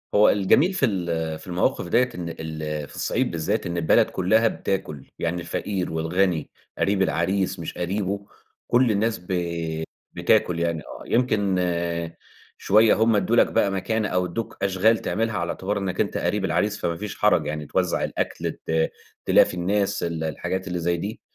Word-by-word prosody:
هو 105 Hz, +1 st, +7 dB
الجميل 130 Hz, -, +3 dB
في 185 Hz, -, +2 dB
ال 85 Hz, -7 st, -2 dB
في 80 Hz, -, -13 dB
المواقف 90 Hz, 0 st, 0 dB
ديّة 125 Hz, +8 st, +3 dB
إن 85 Hz, -1 st, -4 dB
ال 80 Hz, -2 st, -5 dB
في -, -, -13 dB
الصعيد -, -, 0 dB
بالذات 85 Hz, +7 st, -1 dB
إن 85 Hz, 0 st, -3 dB
البلد 80 Hz, -2 st, +4 dB
كُلّها 110 Hz, +5 st, +3 dB
بتاكل، 95 Hz, -10 st, -3 dB
يعني 85 Hz, +1 st, -1 dB
الفقير 90 Hz, +2 st, -3 dB
والغني 80 Hz, +1 st, 0 dB, 0.3 s
قريب 100 Hz, -1 st, +1 dB
العريس 95 Hz, +2 st, 0 dB
مش 85 Hz, -, -5 dB
قريبه 100 Hz, +2 st, -2 dB, 0.4 s
كل 120 Hz, -1 st, +4 dB
الناس 110 Hz, +2 st, 0 dB
ب 90 Hz, -, -19 dB, 0.9 s
بتاكل 85 Hz, -2 st, +2 dB
يعني 85 Hz, -1 st, 0 dB
آه، -, -, -10 dB
يمكن 105 Hz, -6 st, +1 dB
آآ، 85 Hz, -1 st, -2 dB, 0.4 s
شوية 110 Hz, +2 st, +5 dB
هُم 110 Hz, 0 st, +3 dB
إدّوا 110 Hz, +3 st, +2 dB
لك -, -, +5 dB
بقى 100 Hz, -, +2 dB
مكانة 110 Hz, +3 st, -1 dB
أو 90 Hz, 0 st, +1 dB
إدّوك 90 Hz, +6 st, -5 dB
أشغال 100 Hz, +4 st, +3 dB
تعملها 115 Hz, 0 st, -1 dB
على 85 Hz, 0 st, -2 dB
اعتبار 100 Hz, +4 st, -2 dB
إنك 95 Hz, -2 st, -1 dB
أنت -, -, -1 dB
قريب -, -, 0 dB
العريس -, -, 0 dB
فما 85 Hz, -, -1 dB
فيش 105 Hz, +1 st, -6 dB
حَرَج 105 Hz, -7 st, +3 dB
يعني، 75 Hz, 0 st, -3 dB
توزّع -, -, 0 dB
الأكل -, -, -2 dB
ت 80 Hz, 0 st, -1 dB, 0.4 s
تلافي -, -, +5 dB
الناس 95 Hz, +3 st, 0 dB
ال 85 Hz, -2 st, -2 dB
الحاجات 95 Hz, +5 st, -3 dB
اللي 90 Hz, 0 st, -2 dB
زي 85 Hz, +1 st, 0 dB
دي 100 Hz, +6 st, -5 dB
90 Hz, 170 wpm, -24 LUFS, 85-105 Hz, 0.9 s, هو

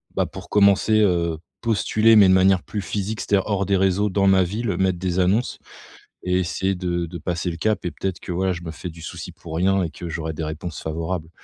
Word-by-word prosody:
bah, -, -, +1 dB
pour -, -, -10 dB
commencer, 105 Hz, +1 st, +4 dB
heu, 85 Hz, -5 st, +1 dB, 0.2 s
postuler 110 Hz, 0 st, +3 dB
mais 105 Hz, -3 st, +8 dB
de 95 Hz, -, +5 dB
manière 95 Hz, -1 st, +4 dB
plus 105 Hz, -, -4 dB
physique. 105 Hz, +4 st, -3 dB
C'est -, -, -4 dB
à -, -, +5 dB
dire, -, -, -5 dB
hors 100 Hz, -2 st, 0 dB
des 100 Hz, -1 st, +2 dB
réseaux 95 Hz, +2 st, +2 dB
dans 100 Hz, +1 st, +1 dB
ma 95 Hz, -1 st, +5 dB
ville, 105 Hz, +1 st, -2 dB
mettre 95 Hz, -1 st, +1 dB
des 90 Hz, 0 st, -1 dB
annonces 100 Hz, +7 st, +1 dB, 0.6 s
et 90 Hz, 0 st, +1 dB
essayer 95 Hz, +2 st, -1 dB
de 85 Hz, -1 st, -2 dB
de 85 Hz, +1 st, -7 dB
passer 90 Hz, +2 st, -2 dB
le 85 Hz, -, -7 dB
cap 110 Hz, +4 st, -1 dB
et 90 Hz, -, -1 dB
peut-être 95 Hz, -2 st, -4 dB
que -, -, -7 dB
voilà, 95 Hz, +2 st, 0 dB
je 85 Hz, 0 st, -8 dB
me 80 Hz, -, -5 dB
fais 80 Hz, +3 st, -7 dB
du 80 Hz, 0 st, -12 dB
souci -, -, -7 dB
pour 80 Hz, -, -9 dB
rien 95 Hz, +3 st, +2 dB
et 85 Hz, -, -3 dB
que 85 Hz, -, -8 dB
j'aurais 80 Hz, 0 st, -4 dB
des 80 Hz, -, -5 dB
réponses 80 Hz, +2 st, -5 dB
favorables. 80 Hz, +1 st, -4 dB
95 Hz, 240 wpm, -22 LUFS, 85-100 Hz, 0.6 s, mais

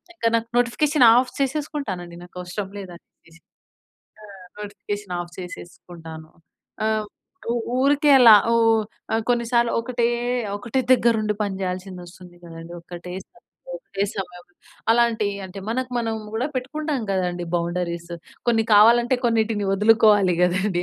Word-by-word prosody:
ఇంక 330 Hz, -, -6 dB
నాకు 230 Hz, 0 st, -5 dB
notification 260 Hz, +3 st, +2 dB
off 250 Hz, +1 st, +2 dB
చేసేసుకుంటానండి, 270 Hz, -, -3 dB
నాకు 175 Hz, -, -16 dB
అవసరం 185 Hz, +2 st, -5 dB
లేదని 180 Hz, -3 st, -10 dB
చెప్పేసి. 165 Hz, +1 st, -23 dB, 0.8 s
ఆ! -, -, -13 dB, 0.4 s
నోటిఫికేషన్ 205 Hz, -1 st, -6 dB
ఆఫ్ 175 Hz, 0 st, -8 dB
చేసేసుకుంటాను. 165 Hz, -3 st, -10 dB, 0.5 s
ఆ! -, -, +2 dB, 0.6 s
ఉ -, -, +1 dB, 0.3 s
ఊరికే 290 Hz, +2 st, +3 dB
అలా 235 Hz, -3 st, +9 dB, 0.2 s
ఊ -, -, +3 dB, 0.7 s
కొన్నిసార్లు 235 Hz, -1 st, +1 dB
ఒకటే, 235 Hz, 0 st, -1 dB, 0.5 s
ఒకటే 245 Hz, +5 st, -2 dB
దగ్గర 235 Hz, -2 st, +4 dB
ఉండి 210 Hz, 0 st, -1 dB
పని 200 Hz, -2 st, -2 dB
జేయాల్సింది 185 Hz, 0 st, -5 dB
వస్తుంది 175 Hz, 0 st, -15 dB
గదండి! 165 Hz, 0 st, -10 dB
ఒకటే, 175 Hz, +1 st, -9 dB, 0.6 s
ఒకటే 200 Hz, -, -4 dB
సమయంలో 180 Hz, -2 st, -8 dB, 0.4 s
అలాంటి 230 Hz, -3 st, +2 dB, 0.2 s
అంటే 190 Hz, +2 st, -10 dB
మనకు 255 Hz, +2 st, -2 dB
మనం 225 Hz, -1 st, -2 dB, 0.2 s
గూడా 245 Hz, +6 st, -1 dB
పెట్టుకుంటాం 290 Hz, +1 st, -3 dB
కదండీ, 180 Hz, -2 st, -2 dB
బౌండరీస్ 170 Hz, 0 st, -3 dB, 0.4 s
కొన్ని 225 Hz, -1 st, +3 dB
కావాలంటే 235 Hz, +4 st, +5 dB
కొన్నిటిని 220 Hz, -3 st, 0 dB
వదులుకోవాలి 210 Hz, -2 st, +4 dB
గదండి! 180 Hz, 0 st, +1 dB
205 Hz, 125 wpm, -22 LUFS, 180-235 Hz, 0.8 s, అలా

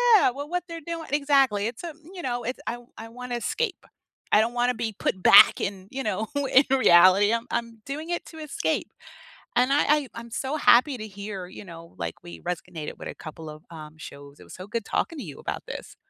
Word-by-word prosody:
yeah, 390 Hz, -, +5 dB
with 280 Hz, +3 st, -6 dB
what 355 Hz, 0 st, -1 dB
they're 335 Hz, 0 st, -6 dB
doin 335 Hz, -1 st, -5 dB
exactly, 275 Hz, -8 st, +3 dB
it's 230 Hz, +7 st, -5 dB
a, 340 Hz, -, -4 dB, 0.2 s
you 360 Hz, -, -7 dB
know, 245 Hz, -3 st, -2 dB
it's 250 Hz, +3 st, -4 dB
I 240 Hz, -, -2 dB, 0.2 s
I 225 Hz, 0 st, -8 dB
wanna 250 Hz, +1 st, -6 dB
escape. 410 Hz, -, -2 dB, 0.5 s
I 210 Hz, -, +6 dB
don't 230 Hz, +2 st, -1 dB
wanna 245 Hz, +1 st, +1 dB
be 225 Hz, -2 st, -3 dB
put 185 Hz, -, -1 dB
back -, -, +8 dB
in, 195 Hz, -1 st, -4 dB
you 270 Hz, 0 st, -4 dB
know, 215 Hz, +1 st, -2 dB, 0.2 s
in 270 Hz, +2 st, +6 dB
reality, 190 Hz, -2 st, +6 dB
I'm 230 Hz, +1 st, -1 dB
I'm 230 Hz, -1 st, -3 dB
doing 305 Hz, +5 st, -5 dB
it 345 Hz, -, -2 dB
to 320 Hz, -, -12 dB
escape, 305 Hz, -2 st, -2 dB, 0.6 s
and 250 Hz, +2 st, +3 dB
I 285 Hz, -, +4 dB
I 295 Hz, -2 st, +3 dB
I'm 230 Hz, 0 st, -9 dB
so 270 Hz, +5 st, -2 dB
happy 255 Hz, +1 st, +5 dB
to 215 Hz, -1 st, -6 dB
hear, 200 Hz, -2 st, -7 dB
you 185 Hz, -, -10 dB
know, 170 Hz, -1 st, -12 dB
like, 85 Hz, -1 st, -5 dB
we 85 Hz, -1 st, -10 dB
resonated 165 Hz, -3 st, -5 dB
with -, -, -8 dB
a -, -, -6 dB
couple 155 Hz, 0 st, -9 dB
of, 155 Hz, +1 st, -11 dB
um, 155 Hz, -2 st, -10 dB
shows, 140 Hz, -2 st, -11 dB
it -, -, -13 dB
was -, -, -12 dB
so 185 Hz, -, -8 dB
good 230 Hz, 0 st, -3 dB
talking 330 Hz, -, -2 dB
to 260 Hz, -, -5 dB
you 145 Hz, -5 st, -9 dB
about -, -, -5 dB
this. -, -, -8 dB
230 Hz, 225 wpm, -26 LUFS, 185-275 Hz, 0.6 s, back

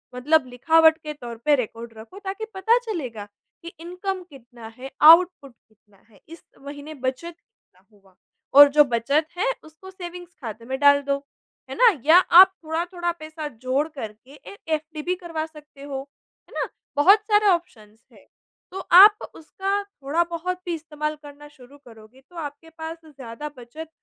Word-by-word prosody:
मतलब 285 Hz, +3 st, +2 dB
लिखावट 320 Hz, +6 st, +4 dB
के 305 Hz, -1 st, -8 dB
तौर 240 Hz, -5 st, -9 dB
पे 300 Hz, -1 st, +5 dB
रिकॉर्ड 230 Hz, -2 st, -6 dB
रखो 230 Hz, -, -12 dB
ताकि 390 Hz, +3 st, -5 dB
पता 385 Hz, +5 st, +2 dB
चलेगा, 285 Hz, -, -6 dB, 0.4 s
कि 335 Hz, -, -9 dB
इनकम 365 Hz, +3 st, -5 dB
कितना 240 Hz, -5 st, -14 dB
है 265 Hz, +1 st, -9 dB
आउटपुट 325 Hz, -4 st, +6 dB
कितना 210 Hz, -2 st, -32 dB
है 205 Hz, -4 st, -23 dB
इस 330 Hz, 0 st, -13 dB, 0.2 s
महीने 285 Hz, +2 st, -10 dB
बचत 265 Hz, +5 st, -5 dB
कितना 195 Hz, -, -35 dB
हुआ 195 Hz, -3 st, -26 dB, 0.4 s
और 285 Hz, +1 st, +9 dB
जो 295 Hz, -, +9 dB
बचत 275 Hz, +5 st, 0 dB
है 460 Hz, +7 st, +1 dB
उसको 315 Hz, +5 st, -14 dB
सेविंग्स 355 Hz, -1 st, -10 dB
ख़ाते 230 Hz, -2 st, -8 dB
में 265 Hz, +2 st, -4 dB
डाल 285 Hz, 0 st, +5 dB
दो। 280 Hz, 0 st, -1 dB, 0.5 s
है -, -, -6 dB
ना? 485 Hz, -1 st, +6 dB
या 320 Hz, +3 st, +7 dB
आप 375 Hz, +1 st, +7 dB
थोड़ा-थोड़ा 345 Hz, +2 st, -3 dB
पैसा 310 Hz, 0 st, -7 dB
जोड़ 260 Hz, +3 st, -2 dB
करके 250 Hz, -4 st, -10 dB
एक 400 Hz, +6 st, -13 dB
एफडी 310 Hz, 0 st, -3 dB
भी 360 Hz, +4 st, -2 dB
करवा 330 Hz, -3 st, -5 dB
सकते 300 Hz, -3 st, -16 dB
हो, 275 Hz, -2 st, -5 dB, 0.5 s
है -, -, -18 dB
ना? -, -, -2 dB, 0.3 s
बहुत 380 Hz, +9 st, +6 dB
सारे 415 Hz, 0 st, +4 dB
ऑप्शन्स 225 Hz, -, -2 dB
हैं। -, -, -21 dB, 0.4 s
तो 380 Hz, -, -6 dB
आप 410 Hz, +4 st, +9 dB, 0.2 s
उसका 390 Hz, +5 st, -3 dB
थोड़ा-बहुत 340 Hz, +1 st, -3 dB
भी 350 Hz, -, -3 dB
इस्तेमाल 305 Hz, -1 st, -5 dB
करना 290 Hz, 0 st, -13 dB
शुरू 285 Hz, -1 st, -18 dB
करोगे 225 Hz, +2 st, -17 dB
तो 355 Hz, -, -20 dB
आपके 295 Hz, +1 st, -8 dB
पास 325 Hz, 0 st, -8 dB
ज़्यादा 275 Hz, -1 st, -9 dB
बचत 275 Hz, +7 st, -10 dB
305 Hz, 165 wpm, -23 LUFS, 260-345 Hz, 0.5 s, और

